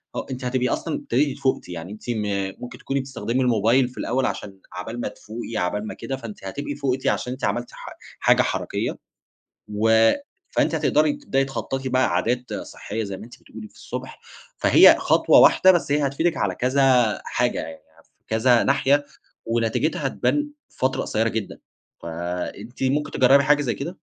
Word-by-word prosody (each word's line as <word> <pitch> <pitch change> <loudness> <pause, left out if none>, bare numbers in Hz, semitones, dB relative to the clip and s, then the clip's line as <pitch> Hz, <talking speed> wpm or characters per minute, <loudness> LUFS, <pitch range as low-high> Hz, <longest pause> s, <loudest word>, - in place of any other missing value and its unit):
آه - - -3
أنتِ 130 0 -5
هتبقي 125 0 0
أصلًا 160 - -2
ابتديتِ 140 +3 -1
فوقتِ 130 -7 -1
يعني 90 +1 -7
أنتِ 110 +3 -11
م 100 -4 -1
ممكن 125 - -8
تكوني 135 0 -2
بتستخدمي 130 -1 -2
الموبايل 120 +1 +3
في 125 - -19
الأول 130 +2 0
عشان 95 -5 -5
عقبال 110 +6 -6
ما - - -2
تفوقي، 110 +2 -7
عقبال 105 +4 -1
ما - - -5
كده، 135 - -5
فأنتِ 115 -6 -9
هتبقي 145 +8 -5
فوقتِ 135 -2 -2
عشان 125 - 0
أنتِ 130 - -11
عملتِ 120 0 -2
حا - - -10 0.3
حاجة - - +4
حركيَّة - - -2 0.7
و 110 +2 +4 0.4
فأنتِ 160 - +1
هتقدري 150 -1 +2
تبدئي 135 -1 -1
تخطَّطي 135 0 -4
بقى 130 -3 +2
عادات 125 +7 -1
صحيَّة 110 +2 -5
زي 100 -2 -5
ما 105 - -10
أنتِ 120 - -15
بتقولي 110 0 -11
في - - -28
الصبح، - - -7 0.4
فهي - - +7
خطوة - - +4
واحدة، 185 - +7
بس 175 -5 0
هي 145 -1 +2
هتفيدِك 160 +5 0
على 95 -3 -1
كذا 125 -4 +2
حاجة 120 0 0
يعني، 80 0 -6 0.3
في - - -41
كذا 115 +2 +3
ناحية 140 +1 +2 0.4
ونتيجتها 120 +7 0
هتبان 295 - 0 0.2
في - - -27
فترة 130 +1 0
قصيَّرة 110 +1 0
جدًا، 110 -3 -5 0.4
فأنتِ 90 +8 -5
ممكن 145 +3 0
تجرَّبي 135 +2 +5
حاجة 145 +1 +3
زي 125 - -1
كده؟ 170 +7 -6
125 Hz, 175 wpm, -23 LUFS, 110-135 Hz, 0.7 s, فهي